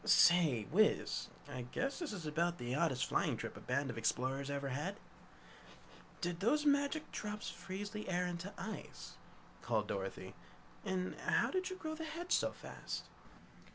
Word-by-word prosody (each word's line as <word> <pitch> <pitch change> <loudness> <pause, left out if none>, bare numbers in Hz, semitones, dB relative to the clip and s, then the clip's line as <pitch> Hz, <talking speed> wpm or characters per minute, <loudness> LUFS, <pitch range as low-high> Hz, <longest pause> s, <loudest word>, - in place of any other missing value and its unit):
"Say, 170 - +6
Wiz, 215 +6 +3 0.2
I 130 -3 -4
guess 275 +4 -1
this 340 -7 -2
is 180 -6 -5
about 170 +3 +1
the 120 +1 -3
oddest 140 -3 +2
flying - - +1
trip - - -4
a - - -7
band 135 +1 0
of 115 - -5
explorers 135 +4 +1
ever 140 -1 -1
had?" 165 +11 -2 1.2
"Did 175 -1 -1
those 295 +10 +3
magic 285 +1 +3
drops 210 0 -3
freeze 195 +2 -5
the 210 -2 -4
air 180 0 +2
into 180 +2 -3
ice?" 220 - -6 0.4
called - - +1
Dorothy. - - -3 0.5
"And 185 -2 -1
how'd 370 0 +2
you 370 - -4
grow 315 -4 -4
the 320 +1 -5
hedge 330 +3 -5
so - - +4
fast?" - - -5
185 Hz, 155 wpm, -37 LUFS, -, 1.2 s, Say